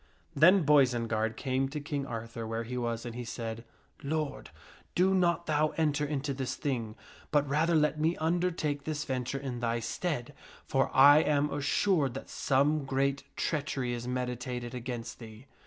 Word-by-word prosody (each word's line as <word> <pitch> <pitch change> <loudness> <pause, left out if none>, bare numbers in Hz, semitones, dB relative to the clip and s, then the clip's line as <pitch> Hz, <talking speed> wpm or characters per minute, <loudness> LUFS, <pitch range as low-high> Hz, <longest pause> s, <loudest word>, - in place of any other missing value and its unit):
Then 180 +5 +6
Boisenard 115 -6 +2
came 135 0 0
to 150 +2 -4
King 145 -1 -3
Arthur 115 0 -5
where 115 +1 -2
he 125 +2 -6
was, 120 -1 -2
and 120 - -5
he 125 +1 -5
said, 115 -1 -5 0.2
" - - -34 0.2
Lord, 155 0 -3 0.5
do 185 +2 +4
not 170 -2 +2
thou 155 -1 +1
enter 150 -2 +1
into 145 -1 -2
this 130 -1 -3
thing, 115 -6 -3 0.3
but 145 -1 +2
rather 160 +4 +2
let 150 0 +2
me 160 +3 +1
undertake 160 -3 0
this 150 -1 -3
venture 130 0 -2
in 130 -3 -5
thy 115 -1 0
stead, 120 +3 -3 0.3
for 135 0 +1
I 145 +3 +8
am 150 -2 +1
assured 145 -1 +1
that - - -7
some 140 +2 +2
great 135 +1 0
treachery 140 -5 -1
is 120 0 -5
meditated 125 -1 -3
against 120 -1 -5
thee." 115 +1 -11
135 Hz, 165 wpm, -30 LUFS, 120-150 Hz, 0.5 s, I